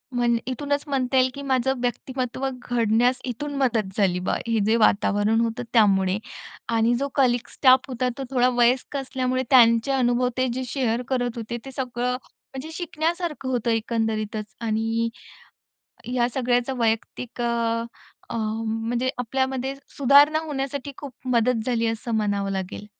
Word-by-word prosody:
म्हण 240 Hz, -1 st, +2 dB
इथूनच 285 Hz, +3 st, -1 dB
म्हणता 265 Hz, -2 st, 0 dB
येईल 255 Hz, 0 st, +4 dB
की 280 Hz, -, -7 dB
माझं 265 Hz, -1 st, 0 dB
व्यक्तिमत्व 255 Hz, +1 st, -2 dB
घडण्यास 245 Hz, -1 st, +1 dB
इथून 275 Hz, +4 st, -4 dB
मदत 225 Hz, -7 st, 0 dB
झाली 185 Hz, -4 st, +2 dB
बा, 180 Hz, -, -1 dB
हे 230 Hz, -1 st, +1 dB
जे 220 Hz, +2 st, +3 dB
वातावरण 210 Hz, 0 st, +3 dB
होतं 230 Hz, +1 st, -1 dB
त्यामुळे. 195 Hz, -4 st, +4 dB, 0.5 s
आणि 230 Hz, +1 st, +3 dB
जो 280 Hz, -, 0 dB
कलीग 245 Hz, -3 st, +2 dB
स्टाफ 260 Hz, -1 st, +5 dB
होता 250 Hz, 0 st, -1 dB
तो 270 Hz, -, -4 dB
थोडा 250 Hz, -1 st, +3 dB
वयस्क 245 Hz, +3 st, +2 dB
असल्यामुळे 255 Hz, -1 st, -1 dB
त्यांचे 230 Hz, 0 st, +5 dB
अनुभव 250 Hz, -2 st, +2 dB
ते 255 Hz, -, +2 dB
जे 260 Hz, +1 st, -3 dB
शेअर 245 Hz, -2 st, 0 dB
करत 245 Hz, -2 st, -1 dB
होते 230 Hz, +1 st, -4 dB
ते 270 Hz, -, -7 dB
सगळं 250 Hz, -1 st, -2 dB
म्हणजे 270 Hz, +3 st, -11 dB
शिकण्यासारखं 330 Hz, -3 st, -2 dB
होतं 240 Hz, -2 st, 0 dB
एकंदरीतच 220 Hz, -1 st, -2 dB
आणि 225 Hz, +1 st, 0 dB, 1.0 s
ह्या 245 Hz, 0 st, 0 dB
सगळ्याचं 250 Hz, 0 st, 0 dB
वैयक्तिक 230 Hz, +1 st, -2 dB
अ, 235 Hz, -, +1 dB, 0.8 s
अ, -, -, -3 dB
म्हणजे 225 Hz, +3 st, -1 dB
आपल्यामध्ये 265 Hz, +2 st, -1 dB, 0.2 s
सुधारणा 285 Hz, +3 st, +6 dB
होण्यासाठी 280 Hz, -1 st, -4 dB
खूप 280 Hz, -3 st, -8 dB, 0.2 s
मदत 230 Hz, -1 st, +2 dB
झाली 235 Hz, -2 st, +1 dB
असं 225 Hz, +1 st, -2 dB
म्हणावं 205 Hz, -2 st, 0 dB
लागेल. 190 Hz, +1 st, -4 dB
245 Hz, 145 wpm, -24 LUFS, 225-265 Hz, 1.0 s, सुधारणा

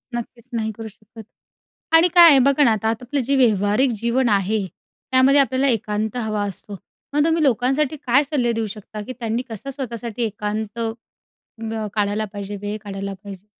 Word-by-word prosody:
नक्कीच, 240 Hz, +1 st, -7 dB
नाही 220 Hz, -1 st, -1 dB
करू 225 Hz, -1 st, -6 dB
शकत. 215 Hz, +1 st, -14 dB, 0.7 s
आणि 325 Hz, +2 st, +6 dB
काय 345 Hz, -1 st, +10 dB
आहे, 280 Hz, -3 st, +7 dB
बघा 280 Hz, +3 st, +4 dB
ना, 240 Hz, -, +5 dB
आता 220 Hz, 0 st, 0 dB
आपलं 245 Hz, +5 st, -2 dB
जे 275 Hz, +4 st, +1 dB
व्यावहारिक 220 Hz, 0 st, +3 dB
जीवन 235 Hz, +2 st, +1 dB
आहे, 205 Hz, 0 st, +1 dB, 0.5 s
त्यामध्ये 260 Hz, +2 st, +5 dB
आपल्याला 265 Hz, 0 st, +1 dB
एकांत 215 Hz, -2 st, -1 dB
हवा 215 Hz, -3 st, -2 dB
असतो. 200 Hz, +1 st, -5 dB, 0.4 s
मग 295 Hz, 0 st, +3 dB
तुम्ही 325 Hz, 0 st, +2 dB
लोकांसाठी 265 Hz, +3 st, +1 dB
काय 255 Hz, +4 st, +5 dB
सल्ले 270 Hz, -5 st, 0 dB
देऊ 225 Hz, -1 st, -1 dB
शकता, 210 Hz, 0 st, -9 dB
की 230 Hz, +5 st, -7 dB
त्यांनी 230 Hz, 0 st, -1 dB
कसं 225 Hz, +4 st, -7 dB
स्वतःसाठी 240 Hz, -4 st, -5 dB
एकांत, 215 Hz, +1 st, -3 dB, 0.6 s
अ, 225 Hz, -1 st, -6 dB
काढायला 210 Hz, 0 st, 0 dB
पाहिजे, 205 Hz, 0 st, -5 dB
वेळ 205 Hz, +1 st, -4 dB
काढायला 195 Hz, -1 st, -5 dB
पाहिजे? 200 Hz, -1 st, -10 dB
225 Hz, 170 wpm, -21 LUFS, 210-260 Hz, 0.7 s, काय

